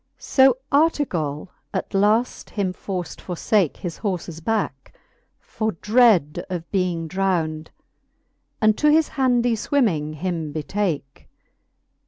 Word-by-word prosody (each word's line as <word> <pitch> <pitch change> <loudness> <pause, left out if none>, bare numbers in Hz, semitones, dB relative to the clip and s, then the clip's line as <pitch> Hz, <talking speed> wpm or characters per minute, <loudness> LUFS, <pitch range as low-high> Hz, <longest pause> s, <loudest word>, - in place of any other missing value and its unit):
XVI. - - -27
So 265 -2 +4
Artegall 195 - +1 0.3
at - - -3
length 210 +5 +1
him 195 -3 -2
forft 180 -2 -5
forfake 180 -1 0
His 175 -3 -6
horfes 175 -5 -4
backe, 200 -10 -2 0.4
for 220 -1 -3
dread 210 - +3
of 175 -2 -4
being 180 -4 -1
drownd. 165 -4 -1 0.9
And 215 -1 +4
to 300 - +4
his 315 +1 +4
handy 245 -3 +2
fwimming 200 - 0
him 165 -2 -3
betake. 155 -3 -3
190 Hz, 115 wpm, -22 LUFS, 160-225 Hz, 0.9 s, So